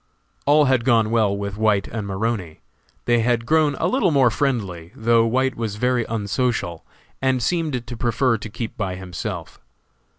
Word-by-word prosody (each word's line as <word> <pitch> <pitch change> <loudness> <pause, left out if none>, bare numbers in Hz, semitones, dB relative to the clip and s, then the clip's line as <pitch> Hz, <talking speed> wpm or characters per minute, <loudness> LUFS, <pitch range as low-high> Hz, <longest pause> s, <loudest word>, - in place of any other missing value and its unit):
All 150 +1 +5
had 130 -3 +2
gone 115 -3 +3
well 110 -4 +2
with 100 0 -4
White 105 -3 +2
and 110 -3 -5
Maroney. 100 -4 -3 0.4
They 120 -1 +3
had 115 0 +1
grown 155 0 +3
a 160 - -2
little 255 +1 +2
more 135 -6 +4
friendly, 100 - -2
though 115 0 +3
White 130 +3 +1
was 115 -3 -4
very 125 +1 +1
unsocial, 105 -5 -2 0.4
and 130 -1 +2
seemed 145 -2 -1
to 120 0 -7
prefer 120 0 +1
to 110 - -7
keep 110 +2 -6
by 95 -4 -3
himself. 90 -2 -6
115 Hz, 165 wpm, -22 LUFS, 105-130 Hz, 0.4 s, All